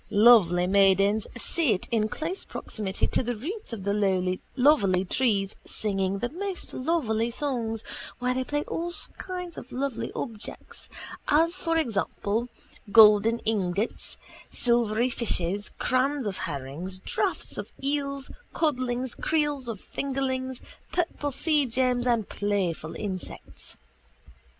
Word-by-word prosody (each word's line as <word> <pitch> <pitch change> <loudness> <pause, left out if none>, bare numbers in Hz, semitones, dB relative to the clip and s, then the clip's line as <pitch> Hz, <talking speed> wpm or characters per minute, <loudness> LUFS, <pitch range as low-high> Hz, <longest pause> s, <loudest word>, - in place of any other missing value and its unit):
Lovely 200 -6 +6
maidens 195 +2 +4
sit 240 - +1
in 215 -2 +2
close 330 - -3
proximity 200 -3 -3
to - - +1
the 245 -1 -2
roots 360 - -4
of 220 -4 -5
the 190 -2 +1 0.2
lovely 225 -10 +4
trees 200 -2 +1
singing 195 -2 0
the 240 +4 -2
most 375 +4 -3
lovely 255 -6 0
songs 235 -4 -2 0.3
while 250 0 0
they 260 0 -1
play 290 +3 -1
with - - -9
all 345 +1 -2 0.3
kinds 360 -2 -5
of 255 - -13
lovely 260 0 -2
objects 225 -4 -6 0.4
as 330 +4 +3
for 330 -2 0
example 225 - -1 0.4
golden 215 +1 +7
ingots, 200 -1 -1 0.3
silvery 235 0 +2
fishes, 205 -4 0
crans 260 +1 +1
of 200 -2 -3
herrings, 145 +7 -4
drafts 185 - -1
of - - -6
eels, 280 -1 -2 0.2
codlings, 255 -5 0
creels 295 -5 0
of 225 -4 -4
fingerlings, 260 -1 -3 0.3
purple 330 -4 -1
seagems 255 -4 +1
and 230 -4 +2
playful 190 -6 -1
insects. 190 -3 -6
235 Hz, 120 wpm, -27 LUFS, 200-275 Hz, 0.4 s, golden